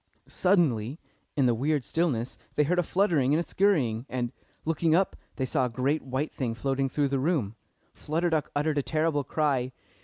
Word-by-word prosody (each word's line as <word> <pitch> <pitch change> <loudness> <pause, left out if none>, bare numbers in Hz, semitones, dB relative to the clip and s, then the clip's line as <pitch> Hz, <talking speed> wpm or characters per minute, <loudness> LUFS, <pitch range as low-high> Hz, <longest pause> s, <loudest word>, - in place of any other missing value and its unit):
Suddenly, 155 - +1 0.4
in 140 - +3
the 120 - +4
weird 140 +3 0
stillness, 135 -8 -1 0.2
they 150 - +4
heard 180 +5 +1
a - - +5
fluttering 165 -7 +2
and - - +2
a - - 0
skurrying, 140 - +1
and, 120 -2 -2 0.3
looking 165 0 +2
up, 190 +2 +2 0.2
they 130 - -1
saw 130 0 +1
a - - -6
great 135 +6 0
white 135 +3 -3
thing 120 -4 -2
floating 135 +2 0
through 140 +1 0
the 135 0 0
room. 130 - 0 0.4
Flutter 165 +3 -1
Duck 155 -2 0
uttered 150 0 +1
a - - +2
terrible 155 0 0
cry. 135 -3 0
145 Hz, 185 wpm, -28 LUFS, 130-160 Hz, 0.4 s, a